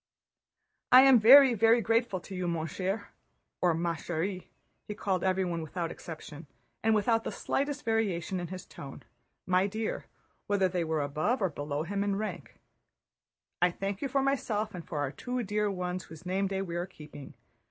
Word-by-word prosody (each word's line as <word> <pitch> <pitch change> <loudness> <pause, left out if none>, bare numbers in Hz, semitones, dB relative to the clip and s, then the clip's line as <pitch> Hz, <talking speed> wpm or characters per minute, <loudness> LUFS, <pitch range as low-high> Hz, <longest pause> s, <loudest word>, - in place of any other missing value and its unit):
"I 255 +1 +10
am 265 -3 +7
very, 260 +4 +9
very 230 +1 +4
grateful 230 -3 +1
to 190 - -9
you, 180 -1 -2
mon 165 -2 -1
cher," 190 +6 -3 0.5
or 175 -2 +3
"ma 170 +1 0
chère"—he 180 +5 -6
called 190 -3 -1
everyone 185 -3 0
without 165 +1 -4
exception 155 -2 -9 0.3
and 220 0 +3
without 225 +2 +2
the - - -3
slightest 285 +1 -2
variation 195 -5 0
in 175 - -4
his 185 +1 -8
tone, 135 -1 -10 0.4
"my 185 +1 +2
dear," 220 +2 -4 0.4
whether 200 -2 +2
they 180 -1 -1
were 160 -2 -1
above 155 - 0
or 190 -3 +1
below 145 0 -3
him 200 +4 -2
in 200 -1 0
rank—"I 200 -3 -6
thank 195 +2 -4
you 275 - -1
for 275 +1 +1
myself 220 -6 -1
and 180 -2 -7
for 155 - -6
our 145 -2 -1
two 250 - -4
dear 210 0 0
ones 180 -1 -3
whose 165 +2 -13
name 190 +2 0
day 195 0 -2
we 170 -2 -4
are 175 +1 -2
keeping. 150 -5 -12
190 Hz, 175 wpm, -30 LUFS, 170-220 Hz, 0.5 s, I